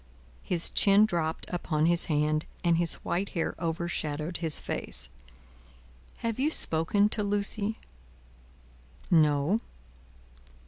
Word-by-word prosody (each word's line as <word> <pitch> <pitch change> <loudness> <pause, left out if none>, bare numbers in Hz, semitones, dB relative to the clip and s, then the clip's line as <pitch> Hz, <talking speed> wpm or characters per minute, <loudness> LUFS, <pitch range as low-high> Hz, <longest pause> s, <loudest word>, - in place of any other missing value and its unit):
His 175 -2 +2
chin 200 +1 +5
dropped 165 -6 -2
upon 155 -3 0
his 170 0 +4
hand, 155 0 0 0.2
and 170 -1 +3
his 170 -1 +3
white 190 +3 -1
hair 165 - -1
overshadowed 165 -1 -3
his 160 -3 +2
face: - - -3 1.2
"Have 230 +1 -2
you 285 +3 +2
spoken 200 - +1
to 215 - -2
Lucie?" 205 +1 -1 1.3
"No." 155 +4 +3
170 Hz, 105 wpm, -28 LUFS, 160-200 Hz, 1.3 s, chin